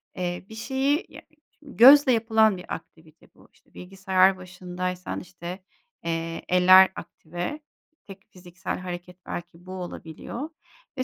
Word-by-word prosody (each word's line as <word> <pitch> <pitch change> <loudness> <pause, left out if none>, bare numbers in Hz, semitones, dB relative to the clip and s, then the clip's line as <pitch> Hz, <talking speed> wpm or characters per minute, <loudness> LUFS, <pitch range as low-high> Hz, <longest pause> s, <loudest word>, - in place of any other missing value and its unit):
eee, 180 -1 -4
bir 220 - -10
şeyi 270 - 0
ya - - -12
e 310 - -25
ç - - -41 0.2
gözle 275 0 +7
yapılan 220 -3 +3
bir 180 - -7
aktivite 160 0 -17
bu. - - -21
İşte, - - -30
bilgisayar 190 0 +1
başındaysan, 180 0 -5
işte, 180 +1 -9 0.4
eee, 165 0 -3
eller 185 +1 +7
aktive, 175 - -6 0.5
tek 195 0 -13
fiziksel 180 -1 -7
hareket 180 0 -8
belki 175 0 -8
bu 185 - -10
olabiliyor 185 - -7 0.5
ve 260 - 0
185 Hz, 135 wpm, -25 LUFS, 175-220 Hz, 0.5 s, gözle